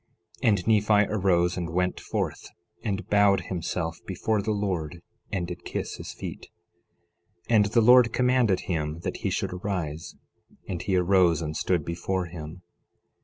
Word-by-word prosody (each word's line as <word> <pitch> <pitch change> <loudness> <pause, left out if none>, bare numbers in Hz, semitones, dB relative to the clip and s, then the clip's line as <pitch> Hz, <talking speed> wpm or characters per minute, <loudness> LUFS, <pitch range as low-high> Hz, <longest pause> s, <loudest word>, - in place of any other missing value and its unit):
11:19 125 - +4
And 100 -3 +1
Nephi 105 -1 +3
arose 90 -3 +2
and 85 -2 -3
went 90 +2 0
forth, - - -3 0.3
and 105 -2 -3
bowed 100 -1 +4
himself 85 -1 -3
before 100 +3 0
the 110 - -4
Lord 90 -5 -2 0.3
and 95 -4 -1
did 90 0 -7
kiss - - -4
his - - -7
feet. - - -8 1.0
11:20 - - +5
And 105 -1 +5
the 110 +3 +3
Lord 125 0 +7
commanded 125 -6 +2
him 80 -2 -3
that - - -3
he - - -2
should - - -2
arise. 90 -4 -4 0.5
And 90 -3 -4
he 95 - 0
arose 90 -3 +3
and 75 0 -4
stood 85 -3 0
before 90 +2 -2
him. 85 +1 -9
90 Hz, 160 wpm, -26 LUFS, 85-105 Hz, 1.0 s, Lord